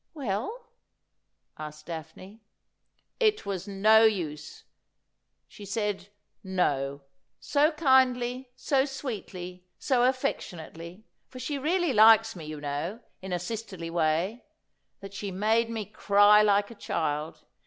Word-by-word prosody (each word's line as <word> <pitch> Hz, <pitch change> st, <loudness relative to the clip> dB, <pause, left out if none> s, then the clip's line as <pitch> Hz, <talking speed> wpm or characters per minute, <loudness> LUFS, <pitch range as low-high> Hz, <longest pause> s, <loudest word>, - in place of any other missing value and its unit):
' -, -, -52 dB
Well 225 Hz, -6 st, -2 dB
V 480 Hz, +2 st, -10 dB, 1.0 s
asked 150 Hz, 0 st, -8 dB
Daphne. 170 Hz, +6 st, -9 dB, 0.4 s
' -, -, -47 dB
It 425 Hz, -, -7 dB
was 190 Hz, -2 st, -4 dB
no 215 Hz, +3 st, +5 dB
use. 160 Hz, -9 st, -1 dB, 0.8 s
She 205 Hz, -, -13 dB
said 200 Hz, -1 st, -3 dB, 0.2 s
" -, -, -51 dB, 0.2 s
No," 140 Hz, 0 st, -1 dB, 0.4 s
so 295 Hz, +2 st, +2 dB
kindly, 260 Hz, -3 st, +2 dB
so 265 Hz, +1 st, +1 dB
sweetly, 185 Hz, -10 st, -7 dB
so 260 Hz, -3 st, +1 dB
afEectionately 185 Hz, -, -3 dB
— -, -, -49 dB
for 255 Hz, -, -12 dB
she 275 Hz, +3 st, -3 dB
really 340 Hz, +1 st, +1 dB
likes 225 Hz, 0 st, +6 dB
me, 165 Hz, -4 st, -8 dB
you 155 Hz, -1 st, -7 dB
know, 145 Hz, +10 st, -4 dB, 0.2 s
in 190 Hz, 0 st, -7 dB
a 180 Hz, -, +1 dB
sisterly 180 Hz, -3 st, -6 dB
way 170 Hz, +7 st, 0 dB, 0.3 s
— -, -, -50 dB
that 195 Hz, 0 st, -9 dB
she 200 Hz, 0 st, -5 dB
made 220 Hz, +5 st, +1 dB
me 225 Hz, -2 st, -4 dB
cry 205 Hz, 0 st, +5 dB
like 205 Hz, 0 st, +2 dB
a -, -, -8 dB
child. 155 Hz, -7 st, -3 dB
205 Hz, 140 wpm, -28 LUFS, 175-245 Hz, 1.0 s, likes